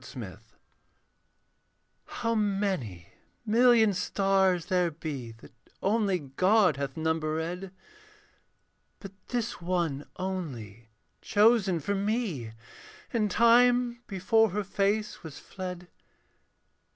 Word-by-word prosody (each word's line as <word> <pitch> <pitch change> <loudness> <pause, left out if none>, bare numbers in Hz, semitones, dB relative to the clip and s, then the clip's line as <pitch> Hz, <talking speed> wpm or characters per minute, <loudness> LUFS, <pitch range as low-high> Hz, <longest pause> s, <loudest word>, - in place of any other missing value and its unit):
AT - - -13
NIGHT - - -7 1.7
How 230 -1 -2
many 195 - -2 0.4
million 230 -1 +5
stars 190 -2 +1
there 180 -2 +1
be, 150 -7 -6
That 115 - -17 0.3
only 200 -2 +2
God 180 +4 +2
hath 140 -1 -4
numberéd; 160 +3 -2 1.3
But 195 - -9 0.2
this 240 -4 -3
one 170 -5 -2
only 125 - -6 0.3
chosen 210 -4 +3
for 200 - -2
me 200 - -2 0.6
In 215 -3 +1
time 240 +2 +4
before 220 +3 +2
her 205 +3 -2
face 205 +2 -1
was 160 -4 -9
fled. 180 -2 -8
190 Hz, 95 wpm, -28 LUFS, 160-215 Hz, 1.7 s, million